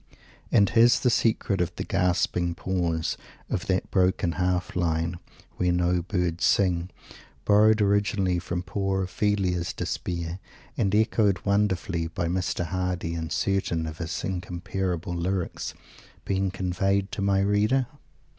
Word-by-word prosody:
And 100 - +5
has 115 0 +5
the 125 - +3
secret 110 -5 +1
of 85 - -2
the - - -3
gasping 90 -1 0
pause 85 -3 -1 0.3
of - - -2
that 95 0 0
broken 90 -2 +2
half 90 +1 -1
line, 85 0 0 0.4
"where 90 -1 +2
no 90 0 +2
birds 90 -2 -1
sing," 90 -2 +2 0.6
borrowed 105 +1 +5
originally 100 -2 +1
from 90 0 -3
poor 95 0 -1
Ophelia's 95 -3 0
despair, 85 0 -3 0.4
and 100 0 +1
echoed 105 -3 +2
wonderfully 95 -4 +1
by 85 +2 -3
Mr. 90 0 -1
Hardy 90 -2 -2
in 80 -1 -4
certain 90 -4 0
of 80 0 -7
his 80 -2 -4
incomparable 90 0 -3
lyrics, 90 +1 -2 0.5
been 95 0 0
conveyed 95 +1 0
to - - -4
my 100 0 +2
reader? 105 +6 +2
90 Hz, 130 wpm, -26 LUFS, 85-100 Hz, 0.6 s, And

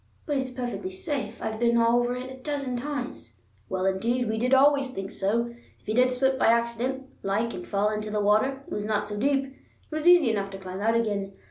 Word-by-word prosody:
"But 290 -3 0
it's 260 -1 -2
perfectly 250 +8 -4
safe. 290 - -4
I've 220 0 -3
been 235 0 +3
all 230 +1 +4
over 245 0 0
it 255 +1 -6
a 260 0 -11
dozen 280 -3 -2
times." 275 0 -5 0.3
"Well, 185 0 -1
indeed, 230 +6 +1
we 220 0 -1
did 250 +2 0
always 275 0 +5
think 195 -5 -6
so. 235 +5 -1 0.3
If - - -31
you 215 - 0
did 250 +2 +4
slip 265 +1 +1
by - - +4
accident, 235 +3 +1 0.2
like, 215 +4 -1
and 180 - -7
fall 205 +1 +1
into 215 0 -3
the 210 0 -1
water, 220 +7 +2
it - - -8
was 210 - -2
not 210 -1 -1
so 210 - -5
deep; 275 +5 +2
it 270 0 -14 0.4
was 310 +2 -1
easy 345 -9 +7
enough 200 -2 -1
to - - -5
climb 185 0 -7
out 225 +2 +2
again. 205 -4 -1
235 Hz, 230 wpm, -27 LUFS, 210-265 Hz, 0.4 s, easy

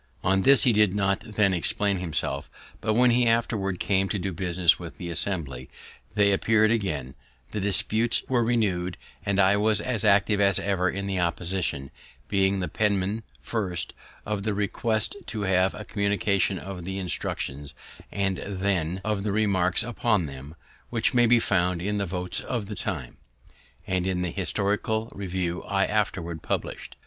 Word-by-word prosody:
On 95 +1 +3
this 135 0 +6
he 120 - +4
did 105 -2 +3
not 100 -2 +1
then 105 -3 +1
explain 100 +3 +1
himself; 85 -4 -3 0.3
but 110 0 0
when 125 +1 +5
he 120 0 +3
afterwards 110 -5 +1
came 95 +1 +1
to 105 - -1
do 95 0 -3
business 90 0 +2
with 85 -2 -8
the 85 -1 -5
Assembly, 80 -8 -3 0.5
they 100 -1 +4
appear'd 110 +2 +3
again, 75 - -1 0.4
the 105 - -3
disputes 110 +3 +2
were 125 -2 +2
renewed, 95 -7 0 0.3
and 100 -1 0
I 100 +1 +5
was 105 0 +2
as 115 -3 -1
active 100 0 +4
as 100 -2 +4
ever 95 -2 +1
in 100 +1 -3
the 95 -2 -1
opposition, 85 -5 -1 0.4
being 95 -1 +2
the 90 - -1
penman, 105 0 0 0.2
first, 90 -7 -3 0.3
of 105 -2 -2
the 105 0 -1
request 110 - -1
to 110 - -4
have 95 -1 +2
a 105 - -7
communication 100 -2 +1
of 90 -1 -7
the 95 +2 -4
instructions, 75 -6 -3 0.4
and 95 -2 0
then 95 -3 -2
of 105 -2 -1
the 105 0 -1
remarks 95 -4 +2
upon 110 -5 0
them, 70 +2 -9 0.3
which 115 -2 +1
may 120 -1 +5
be 120 0 +6
found 90 -5 +1
in 105 +3 -1
the 100 - -1
votes 90 +1 -2
of 115 -5 -3
the 105 +1 -6
time, - - -4 0.7
and 95 0 -1
in 90 -1 0
the 90 - -2
Historical 105 +4 -1
Review 90 -3 -3
I 100 -1 +1
afterward 90 -6 -1
publish'd. - - -4
100 Hz, 165 wpm, -26 LUFS, 90-105 Hz, 0.7 s, this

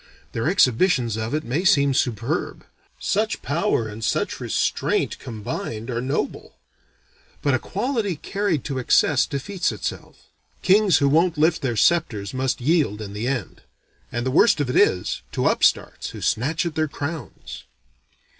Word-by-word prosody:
Their 115 +4 -2
exhibitions 130 - +3
of 110 +5 -2
it 155 - -2
may 145 +8 -1
seem 140 -8 +4
superb, 120 -5 -2 0.3
such - - -1
power 115 - 0
and 110 +1 -8
such - - -1
restraint, - - -1
combined, 115 0 -5
are 120 0 -2
noble, 130 +2 -3 0.9
but 140 - +2
a 130 - +2
quality 215 - -2
carried 195 -1 -2
to 135 -4 -3
excess 130 +2 +3
defeats 175 +7 -2
itself. - - -6 0.5
Kings 200 -1 +5
who 140 - +2
won't 165 +4 +3
lift 160 +2 +2
their 125 -4 -1
scepters 110 - +1
must 130 0 -1
yield 145 - +1
in 100 -2 -7
the 105 +4 -3
end; 130 -6 -3 0.5
and, 120 0 -3
the 130 - 0
worst 160 - +4
of 135 -3 0
it - - -4
is, 90 - +2
to - - +1
upstarts - - +1
who - - -9
snatch 150 +10 0
at 170 - -2
their 155 0 0
crowns. 150 +2 -7
140 Hz, 155 wpm, -23 LUFS, 120-165 Hz, 0.9 s, Kings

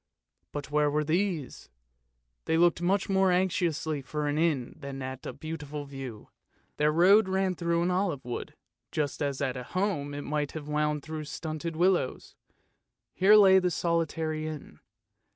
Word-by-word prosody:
But 145 0 -6
where 150 0 +3
were 150 +1 +1
these? 165 -2 -2 0.8
They 160 - +1
looked 170 0 +3
much 190 +3 +1
more 190 -1 +3
anxiously 170 -5 0
for 150 +3 -3
an 145 - 0
inn 150 -7 0
than 140 -2 -7
at 130 0 -6
the - - -5
beautiful 150 -1 -6
view. 135 -6 -8 0.5
Their 150 +1 +3
road 190 +5 +5
ran 190 0 +1
through 170 -1 0
an 180 - +1
olive 180 -8 -1
wood, 120 - -5 0.4
just 145 -3 -2
as 140 -2 -1
at 135 -2 -1
home 145 +1 -2
it 145 - -5
might 150 -1 -2
have 150 -2 -6
wound 150 -1 0
through 155 -1 -5
stunted 155 +2 -5
willows; 175 -5 +1 0.8
here 195 +3 +6
lay 190 -2 +8
the 180 -1 +1
solitary 160 -2 -1
inn. 150 - -8
155 Hz, 155 wpm, -28 LUFS, 145-180 Hz, 0.8 s, lay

